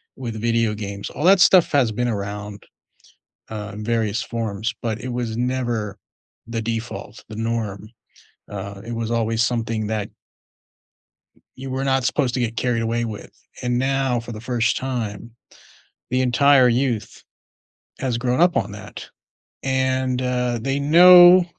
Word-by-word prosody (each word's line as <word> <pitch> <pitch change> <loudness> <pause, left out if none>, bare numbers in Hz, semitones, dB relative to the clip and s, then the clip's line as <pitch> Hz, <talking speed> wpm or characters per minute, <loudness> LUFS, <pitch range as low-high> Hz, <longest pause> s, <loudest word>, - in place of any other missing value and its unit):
with 115 -4 -6
video 115 -1 +1
games, 100 -1 -6
all - - -6
that 185 +2 +6
stuff 180 -1 +6
has 135 -6 +3
been 120 +3 -1
around, 105 -1 -5 0.9
uh, 105 -1 -6
in 105 - -7
various 115 0 0
forms, 115 -2 -3
but 110 -2 -2
it 130 - -6
was 120 -2 -3
never 120 -4 -2 0.5
the 115 -1 -3
default, 115 -1 -5
the - - -7
norm, 110 -3 -3 0.6
uh, 100 0 -7
it 120 - -5
was 115 -1 -3
always 115 0 +1
something 115 -2 -1
that 105 -2 -3 1.5
you 135 +1 -7
were 130 +1 -2
not 135 -1 +1
supposed 125 -1 0
to 130 - -1
get 115 -1 -2
carried 120 0 0
away 115 +1 -1
with, 105 -3 -7 0.3
and 125 -1 0
now 135 -2 0
for 115 0 -9
the 110 - -7
first 120 0 0
time, 115 -4 -4 0.8
the 125 +1 +1
entire 130 +1 +5
youth 120 -3 -1 0.8
has 125 -3 -1
grown 125 +3 0
up 175 0 +4
on - - 0
that, - - -10 0.5
and, 130 -1 0
uh, 125 -1 -1
they 135 +3 -1
know 175 +4 +8
120 Hz, 150 wpm, -22 LUFS, 110-130 Hz, 1.5 s, know